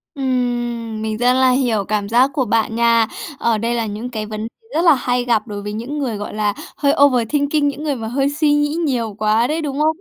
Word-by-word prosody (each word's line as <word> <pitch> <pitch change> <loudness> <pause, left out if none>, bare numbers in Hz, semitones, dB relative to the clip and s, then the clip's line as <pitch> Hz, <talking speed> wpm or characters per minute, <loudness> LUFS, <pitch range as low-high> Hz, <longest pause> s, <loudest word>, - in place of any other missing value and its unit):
Ừm. 240 -4 -2
Mình 220 0 -2
rất 245 +2 +3
là 260 0 +4
hiểu 245 -5 +1
cảm 205 -1 -2
giác 245 +4 +4
của 265 -2 0
bạn 225 0 0
nha. 230 -1 +3 0.3
Ờ, 230 -2 +1
đây 230 +2 -1
là 230 -1 -1
những 215 +4 -5
cái 215 -3 -4
vấn 215 +1 -5 0.3
rất 330 - +2
là 325 - +7
hay 245 -1 -1
gặp 230 -2 +1
đối 205 -2 -5
với 205 0 -5
những 240 +7 -5
người, 240 -7 -2
gọi 205 - -6
là, 210 -1 0 0.2
hơi 280 -1 +2
overthinking, 285 +3 +2
những 285 +1 -3
người 295 -3 -1
mà 225 -3 -5
hơi 275 +4 0
suy 295 +1 +1
nghĩ 295 +1 +1
nhiều 235 -6 -1
quá 215 +2 +2
đấy, 310 +4 -1
đúng 285 -2 -3
không? 315 +1 +2
240 Hz, 235 wpm, -19 LUFS, 220-275 Hz, 0.3 s, là